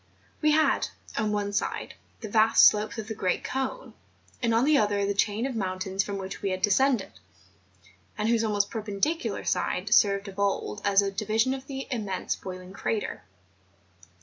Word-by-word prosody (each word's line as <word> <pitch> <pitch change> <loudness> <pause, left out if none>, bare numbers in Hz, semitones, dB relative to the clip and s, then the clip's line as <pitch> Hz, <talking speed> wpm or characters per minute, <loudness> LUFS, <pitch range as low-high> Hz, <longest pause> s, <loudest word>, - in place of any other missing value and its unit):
We 305 - +4
had, 310 0 +3 0.3
on 215 -1 0
one 205 -1 -1
side, 210 - -2 0.3
the 220 - -5
vast 215 +1 +5
slopes 210 +1 +3
of 220 -1 -5
the 220 - -3
great 185 -3 -1
cone, 270 - -4 0.5
and 235 -2 +1
on 230 +3 +3
the 305 +1 +4
other 205 -1 +1
the 200 - 0
chain 205 +3 0
of 270 -2 -3
mountains 190 -1 -1
from 200 0 -4
which 190 0 -6
we 200 - -1
had 185 0 -3
descended, 240 +1 +2 1.1
and 210 0 0
whose 230 -1 +2
almost 205 -2 0
perpendicular 220 - -2
side - - 0
served 200 -1 +4
of 195 0 -9
old 200 +1 -1
as 200 0 +4
a 195 - -1
division 220 +4 0
to 265 - -2
the 270 -1 -5
immense 205 -6 -2
boiling 185 0 -9
crater. 210 +1 -3
210 Hz, 175 wpm, -27 LUFS, 200-230 Hz, 1.1 s, vast